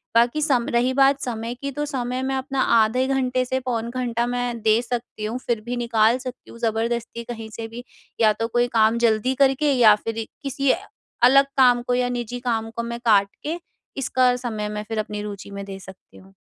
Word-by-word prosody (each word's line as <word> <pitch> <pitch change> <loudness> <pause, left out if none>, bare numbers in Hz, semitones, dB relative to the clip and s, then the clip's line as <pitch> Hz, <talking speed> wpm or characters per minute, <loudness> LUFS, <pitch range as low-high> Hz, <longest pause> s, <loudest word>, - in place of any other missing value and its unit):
बाकी 240 +6 +3
सम 260 -6 +2
रही 245 +2 +2
बात 275 +1 +4
समय 230 -1 -4
की, 280 +3 -5
तो 295 +2 -3
समय 255 -2 -3
मैं 265 0 -1
अपना 265 0 -2 0.2
आधे 240 +4 +2
घंटे 255 -1 +1
से 260 +1 -1
पौन 235 -3 -3
घंटा 240 -1 -1
मैं 245 -1 -2
दे 220 +2 +3
सकती 240 -3 -5
हूँ, 225 +4 -3
फिर 230 -3 0
भी 245 +1 -3
निकाल 230 0 +3
सकती 255 -1 -9
हूँ 235 - -12
ज़बरदस्ती 235 +1 -2
कहीं 225 -2 -7
से 225 -1 -5
भी, 235 +2 -9 0.4
या 215 -1 +5
तो 225 +2 -2
कोई 240 +1 +1
काम 220 +1 +4
जल्दी 220 +3 +2
करके, 275 +2 +2
या 225 -5 +7
फिर 225 0 -4
इ 225 - -2 0.2
किसी 275 0 -1
ऐ - - +1 0.5
अलग 275 +3 +7
काम 245 -2 +5
को 245 - +1
या 250 0 +1
निजी 245 0 -4
काम 225 -1 -1
को 235 +1 -4
मैं 235 0 -5
काट 200 -3 +5 0.2
के, 320 +4 -3 0.4
इसका 255 -1 +2
समय 220 -4 -4
मैं 210 0 -4
फिर 225 -1 -3
अपनी 210 -1 -4
रूचि 200 -1 -7
में 200 0 -6
दे 195 -1 -8
सकती 190 0 -14
हूँ। 190 +1 -17
240 Hz, 215 wpm, -23 LUFS, 225-255 Hz, 0.5 s, या